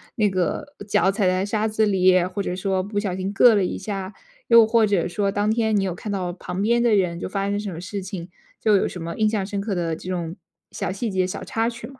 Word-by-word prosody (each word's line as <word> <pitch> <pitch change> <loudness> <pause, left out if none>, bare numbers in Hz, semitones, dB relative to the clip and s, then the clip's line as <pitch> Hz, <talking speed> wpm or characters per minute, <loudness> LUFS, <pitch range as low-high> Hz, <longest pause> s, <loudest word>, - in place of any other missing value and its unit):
那 210 -2 +2
个 190 - -2
脚 195 -1 +3
踩 200 -1 +1
在 185 +1 +1
沙 215 +1 0
子 220 0 +1
里， 185 -2 +4
或 185 +2 -3
者 180 -2 -3
说 190 0 0
不 205 +2 -6
小 200 -3 -2
心 190 +2 -3
硌 235 +3 +7
了 200 -3 +2
一 - - -3
下， 195 0 -5 0.3
又 230 -1 +8
或 225 0 +3
者 195 -5 +1
说 200 +2 0
当 205 +2 +1
天 220 -1 +1
你 195 - +1
有 185 -2 -1
看 205 +5 -7
到 185 -3 -2
旁 180 +1 -5
边 235 +3 +2
的 235 -3 +4
人 180 -4 0
就 - - -4
发 195 +1 -2
生 205 0 -1
什 205 -2 -4
么 165 - -7
事 195 +2 -5
情？ 185 -2 -7 0.3
就 210 -2 +4
有 - - +1
什 180 - -7
么 170 0 -5
印 215 - +3
象 210 -3 -1
深 200 0 -4
刻 200 -1 -2
的 165 -2 -1
这 170 - -11
种 175 -1 -3 0.4
小 - - -3
细 210 +4 -3
节、 185 -1 +1
小 185 - -5
插 225 0 -1
曲 235 0 -8
吗？ 265 -1 -15
195 Hz, 285 characters per minute, -23 LUFS, 185-215 Hz, 0.4 s, 又